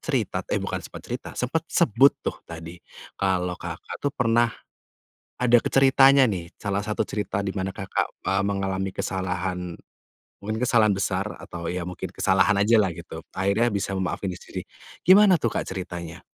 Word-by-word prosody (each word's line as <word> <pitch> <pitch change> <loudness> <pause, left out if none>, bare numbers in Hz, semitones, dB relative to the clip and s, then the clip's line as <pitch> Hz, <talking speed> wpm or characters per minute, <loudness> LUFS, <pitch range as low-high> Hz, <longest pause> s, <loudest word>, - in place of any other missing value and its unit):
cerita - - -1
eh, - - 0
bukan - - -2
sempat - - -10
cerita, - - -5
sempat 155 +6 -1
sebut 135 - +4
tuh - - -2
tadi 85 +1 -8 0.4
kalau 90 -2 +1
Kakak - - -7
tuh 145 - +1
pernah 120 -1 +3 0.9
ada 120 -1 +5
ke - - 0
ceritanya, 135 -1 +6
nih, 85 -4 -4
salah 100 -1 -1
satu 105 0 -3
cerita 100 -1 -2
di 100 - -2
mana 95 0 -2
Kakak, 95 0 -2
eee, 95 0 +2
mengalami 95 -1 -1
kesalahan 90 -2 -3 0.6
mungkin 110 +2 -3
kesalahan 115 -3 +3
besar 95 -2 0 0.2
atau 85 -1 -6
ya 90 -1 -3
mungkin 90 -1 -6
kesalahan 105 -2 +2
ajalah 105 -4 +4
gitu, 80 -1 -8
akhirnya 100 +5 +1
bisa 100 -1 -2
memaafin 95 +1 -2
diri - - -13
sendiri. - - -6 0.4
Gimana 190 -1 +7
tuh, 115 -6 -1
Kak, - - 0
ceritanya? 85 -3 -6
100 Hz, 160 wpm, -25 LUFS, 90-115 Hz, 0.9 s, Gimana